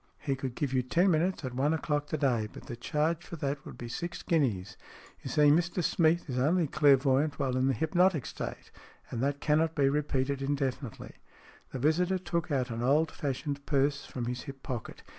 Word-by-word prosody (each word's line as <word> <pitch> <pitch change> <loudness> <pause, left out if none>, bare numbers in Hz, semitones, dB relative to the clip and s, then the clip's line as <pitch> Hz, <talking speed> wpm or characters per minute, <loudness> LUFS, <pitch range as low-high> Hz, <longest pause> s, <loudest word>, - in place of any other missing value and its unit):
" - - -39
He 135 - +2
could 130 -2 -5
give 140 -3 -2
you 130 - +3
ten 175 +9 +2
minutes 170 0 +1
at 130 - -4
one 145 +5 +1
o'clock 145 -2 -1
to 155 - -2
day. 125 -7 +1
But - - -11
the 120 - -6
charge 155 +7 -1
for 170 - -8
that 140 -2 -3
would - - -10
be 120 - -6
six 170 +9 -5
guineas. 105 - 0 0.5
You - - -6
see, 150 +3 +3
Mr 175 +3 +1
Smeath 165 +1 +2
is 130 -2 -2
only 165 +6 +3
clairvoyant 140 0 +3
while 135 -3 0
in 130 +1 +2
the 135 - +2
hypnotic 165 - +2
state, - - -6 0.4
and 120 - -3
that 140 +1 -1
cannot 155 +2 +2
be 140 -2 +3
repeated 140 -1 0
indefinitely." 135 -3 -3 0.5
The - - -4
visitor 170 +7 +2
took 170 -2 -2
an 125 -5 -1
old 150 +6 +3
fashioned 140 0 -3
purse 140 0 +1
from 125 -2 -4
his 125 +1 -3
hip 135 -1 -10
pocket. 120 -4 -6
140 Hz, 200 wpm, -30 LUFS, 130-160 Hz, 0.5 s, you